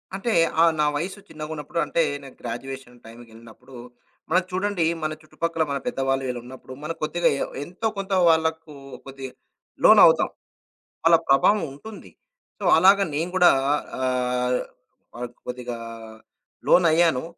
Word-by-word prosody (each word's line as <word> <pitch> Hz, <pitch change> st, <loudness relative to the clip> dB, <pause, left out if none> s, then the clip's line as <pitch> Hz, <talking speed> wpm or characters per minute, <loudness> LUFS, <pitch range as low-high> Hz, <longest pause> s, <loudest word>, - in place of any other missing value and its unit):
అంటే, 215 Hz, +5 st, -2 dB, 0.3 s
ఆహ్, 165 Hz, 0 st, +6 dB
నా 150 Hz, -, +3 dB
వయసు 185 Hz, +7 st, -4 dB
చిన్నగున్నప్పుడు 155 Hz, +1 st, -6 dB
అంటే, 170 Hz, -, 0 dB, 0.2 s
నేను 135 Hz, -, -12 dB
గ్రాడ్యుయేషన్ 125 Hz, +1 st, -7 dB
టైంకెళ్ళినప్పుడు 115 Hz, +2 st, -15 dB, 0.5 s
మనం 185 Hz, -, +3 dB
చూడండి, 190 Hz, -2 st, -1 dB, 0.2 s
మన 155 Hz, -, -1 dB
చుట్టుపక్కల 165 Hz, +1 st, -2 dB
మన 140 Hz, -, -1 dB
పెద్దవాళ్ళు 135 Hz, 0 st, -1 dB
వీళ్ళున్నప్పుడు, 125 Hz, +1 st, -8 dB
మన 155 Hz, -, -3 dB
కొద్దిగా 170 Hz, +3 st, +1 dB
ఎ -, -, +2 dB, 0.2 s
ఎంతో 185 Hz, +8 st, -4 dB
కొంత 195 Hz, 0 st, -5 dB, 0.2 s
వాళ్ళకు 160 Hz, -1 st, 0 dB, 0.3 s
కొద్దిగా 135 Hz, -1 st, -8 dB, 0.5 s
లోనవుతాం. -, -, +7 dB, 0.8 s
వాళ్ళ 165 Hz, 0 st, +7 dB
ప్రభావం 155 Hz, +10 st, +4 dB
ఉంటుంది. 210 Hz, +10 st, -12 dB, 0.5 s
సో, -, -, -5 dB
అలాగా 195 Hz, +3 st, +5 dB
నేను 165 Hz, +4 st, -2 dB
గూడా 180 Hz, -1 st, +6 dB, 0.5 s
ఆహ్, 125 Hz, -1 st, 0 dB, 0.6 s
వాటికి 120 Hz, 0 st, -8 dB
కొద్దిగా 125 Hz, -1 st, -5 dB, 0.9 s
లోనయ్యాను. 165 Hz, -5 st, +4 dB
150 Hz, 120 wpm, -23 LUFS, 125-170 Hz, 0.9 s, లోనవుతాం